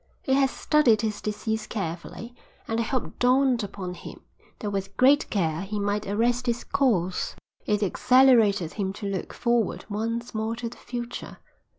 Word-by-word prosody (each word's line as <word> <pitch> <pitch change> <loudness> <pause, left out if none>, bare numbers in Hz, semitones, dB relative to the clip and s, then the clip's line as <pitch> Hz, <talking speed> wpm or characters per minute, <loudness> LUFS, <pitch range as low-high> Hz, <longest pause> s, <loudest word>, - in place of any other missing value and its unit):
He 265 - +1
had 270 0 +4
studied 255 -10 +3
his 215 -2 -2
disease 215 +1 -3
carefully, 195 +4 -5 0.3
and 225 0 -1
the - - +2
hope 255 +2 -3
dawned 250 -1 +3
upon 190 -2 -5
him - - -10 0.4
that 210 - -4
with 195 0 -4
great 280 +4 +5
care 165 -5 0
he 205 +2 -4
might 205 +1 -1
arrest 240 +5 +1
its 235 0 0
course. 185 -10 0 0.3
It 210 0 +1
exhilarated 220 -5 +4
him 195 -2 -2
to 205 - -7
look 195 -2 -3
forward 235 -4 0
once 230 +3 -3
more 220 +1 -2
to 235 0 -4
the 240 - -13
future. 240 0 -6
220 Hz, 165 wpm, -26 LUFS, 200-245 Hz, 0.4 s, great